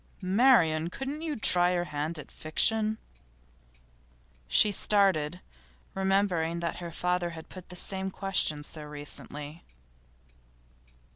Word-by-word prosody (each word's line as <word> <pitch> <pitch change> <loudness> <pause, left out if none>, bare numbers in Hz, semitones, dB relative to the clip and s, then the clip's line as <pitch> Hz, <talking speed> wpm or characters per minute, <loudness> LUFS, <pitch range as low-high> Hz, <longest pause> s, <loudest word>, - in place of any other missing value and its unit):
'Marian, 185 -6 +3
couldn't 270 - -6
you 320 -2 -3
try 180 -6 +5
your 175 -1 0
hand 155 0 -4
at 150 - -11
fiction?' 215 +7 +2 1.5
She 205 - +5
started, 185 -5 +2 0.5
remembering 190 -4 0
that 170 0 -4
her 175 -1 -7
father 180 +1 -1
had 160 - -11
put 185 -2 -12
the 180 - -10
same 190 +1 -1
question 185 -6 -1
so 155 +1 -1
recently. 150 +1 -7
180 Hz, 115 wpm, -28 LUFS, 155-195 Hz, 1.5 s, try